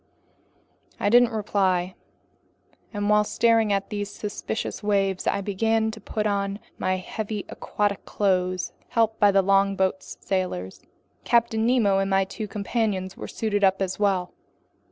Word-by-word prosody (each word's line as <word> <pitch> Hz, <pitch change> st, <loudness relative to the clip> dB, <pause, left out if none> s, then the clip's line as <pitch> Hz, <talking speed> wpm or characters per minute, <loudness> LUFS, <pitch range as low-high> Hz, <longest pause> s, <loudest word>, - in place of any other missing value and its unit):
I -, -, +1 dB
didn't 245 Hz, +1 st, +6 dB
reply, 190 Hz, -4 st, 0 dB, 1.0 s
and 205 Hz, -2 st, -2 dB
while 210 Hz, 0 st, +4 dB
staring 225 Hz, 0 st, +2 dB
at 195 Hz, -1 st, -1 dB
these 205 Hz, -1 st, -3 dB
suspicious 210 Hz, +1 st, -4 dB
waves, 195 Hz, -2 st, 0 dB
I -, -, +1 dB
began 220 Hz, +3 st, 0 dB
to 220 Hz, -1 st, -11 dB
put 215 Hz, +1 st, -3 dB
on 200 Hz, -1 st, -1 dB, 0.2 s
my 185 Hz, 0 st, +1 dB
heavy 210 Hz, +2 st, -5 dB
aquatic 205 Hz, -1 st, -2 dB
clothes, 185 Hz, -2 st, 0 dB, 0.2 s
helped 225 Hz, -1 st, +1 dB
by 205 Hz, -, +6 dB
the 195 Hz, 0 st, +3 dB
longboat's 195 Hz, -1 st, +1 dB
sailors. 180 Hz, -, -3 dB, 0.4 s
Captain 230 Hz, -1 st, +2 dB
Nemo 215 Hz, -6 st, +3 dB
and 195 Hz, 0 st, 0 dB
my 195 Hz, 0 st, +3 dB
two 215 Hz, +3 st, -6 dB
companions 200 Hz, -2 st, -2 dB, 0.2 s
suited 205 Hz, -2 st, -1 dB
up 190 Hz, 0 st, +4 dB
as 190 Hz, 0 st, -2 dB
well. 190 Hz, -3 st, +1 dB
200 Hz, 135 wpm, -25 LUFS, 190-215 Hz, 1.0 s, didn't